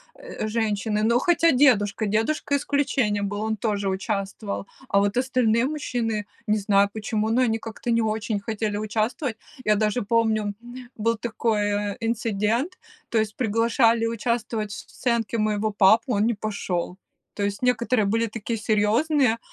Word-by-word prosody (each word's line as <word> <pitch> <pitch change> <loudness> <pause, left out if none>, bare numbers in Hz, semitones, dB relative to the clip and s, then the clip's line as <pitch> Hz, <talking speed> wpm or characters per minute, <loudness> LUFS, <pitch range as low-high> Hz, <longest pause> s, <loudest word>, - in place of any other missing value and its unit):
э, - - -6
женщины. 215 -1 -1
Но 235 +2 +3
хотя 335 +2 +3
дедушка, 225 -6 +3
дедушка 225 +8 0
исключением 265 -8 0
был, 205 +1 -4
он 220 0 -1
тоже 205 -2 -1
участвовал. 195 +1 -3 0.2
А 200 - +3
вот 200 +2 +1
остальные 250 -3 +2
мужчины, 240 -7 -2 0.2
не 215 0 +3
знаю 200 -1 +3
почему, 215 0 -2
но 235 +3 +2
они 225 -3 +2
как-то 225 +2 -7
не 230 0 +3
очень 220 -1 -1
хотели 210 0 -2
участвовать. 220 +4 -2 0.3
Я 210 - +4
даже 215 +3 +1
помню, 220 -1 +1
м, 240 +1 -11 0.2
был 230 +1 0
такой, 225 -1 -1
э, 205 -1 -1
инцидент, 230 - -1 0.3
то 230 - 0
есть 215 -1 -1
приглашали 230 0 +2
участвовать 230 -1 -2
в - - -5 0.2
сценке 235 -2 -1
моего 215 0 0
папу, 220 +5 +4
он 205 0 +2
не 235 0 +1
пошел. 195 -4 -3 0.4
То 205 - -2
есть 200 0 -3
некоторые 245 -2 +2
были 225 +3 +1
такие 225 +1 -4
серьезные 225 +5 +2
220 Hz, 155 wpm, -24 LUFS, 210-235 Hz, 0.4 s, Я